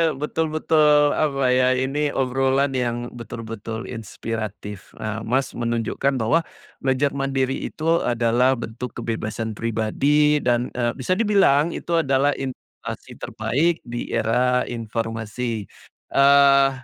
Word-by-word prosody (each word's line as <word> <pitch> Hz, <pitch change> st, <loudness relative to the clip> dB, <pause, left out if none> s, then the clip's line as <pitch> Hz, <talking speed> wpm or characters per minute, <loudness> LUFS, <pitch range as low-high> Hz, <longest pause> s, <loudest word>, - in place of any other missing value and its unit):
betul 150 Hz, +3 st, -2 dB
betul 150 Hz, -2 st, +3 dB
apa 135 Hz, -4 st, +1 dB
ya 130 Hz, 0 st, +3 dB
ini 135 Hz, +3 st, 0 dB
obrolan 135 Hz, +1 st, +1 dB
yang 120 Hz, -1 st, -2 dB
betul-betul 115 Hz, -1 st, -7 dB
inspiratif 110 Hz, -3 st, -6 dB
nah 110 Hz, +1 st, -4 dB
Mas 130 Hz, +4 st, 0 dB
menunjukkan 120 Hz, +3 st, -1 dB
bahwa, 120 Hz, +7 st, +2 dB, 0.4 s
belajar 135 Hz, +1 st, +1 dB
mandiri 135 Hz, -1 st, -1 dB
itu 165 Hz, +2 st, 0 dB
adalah 120 Hz, +2 st, +2 dB
bentuk 115 Hz, +1 st, -7 dB
kebebasan 110 Hz, -1 st, -3 dB
pribadi 140 Hz, +7 st, +2 dB
dan, 120 Hz, -2 st, 0 dB
eee, 120 Hz, -1 st, -1 dB
bisa 185 Hz, -, -1 dB
dibilang 180 Hz, -8 st, +3 dB
itu 170 Hz, -1 st, 0 dB
adalah 140 Hz, -1 st, +2 dB
inovasi 135 Hz, -1 st, -8 dB
terbaik 140 Hz, +10 st, -1 dB
di 120 Hz, 0 st, -5 dB
era 125 Hz, +3 st, +2 dB
informasi, 115 Hz, -1 st, -4 dB, 0.4 s
eee, 140 Hz, 0 st, +5 dB
125 Hz, 115 wpm, -22 LUFS, 115-140 Hz, 0.4 s, eee